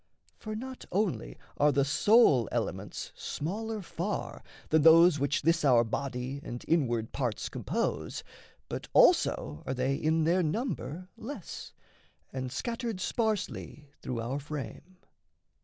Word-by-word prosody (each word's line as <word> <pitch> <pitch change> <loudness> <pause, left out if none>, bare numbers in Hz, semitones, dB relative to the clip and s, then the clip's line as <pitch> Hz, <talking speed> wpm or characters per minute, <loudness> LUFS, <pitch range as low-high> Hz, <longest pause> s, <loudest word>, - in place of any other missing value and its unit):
For 215 -1 -5
not 260 +3 -7
only 175 - -1 0.2
Are 150 +1 +4
the 140 -1 +2
soul 145 - +5
elements - - -3
smaller 215 +6 -4
far 165 - -4 0.3
than 160 0 +4
those 165 0 +7
Which 140 0 0
this 165 +2 +3
our 125 -5 +6
body 130 +3 -3
and 120 - -7
inward 120 -9 +1
parts 125 -6 -2
compose, - - -2 0.4
But - - -5
also 75 +1 +4
are 130 - -1
they 130 +2 +1
in 160 +3 +1
their 175 +4 +3
number 180 - -3
less, 225 - -7 0.6
And 130 -1 -4
scattered 230 - -3
sparsely 200 - -2
through 120 -2 -3
our 125 +5 -2
frame. 150 +5 -7
155 Hz, 125 wpm, -30 LUFS, 130-195 Hz, 0.6 s, those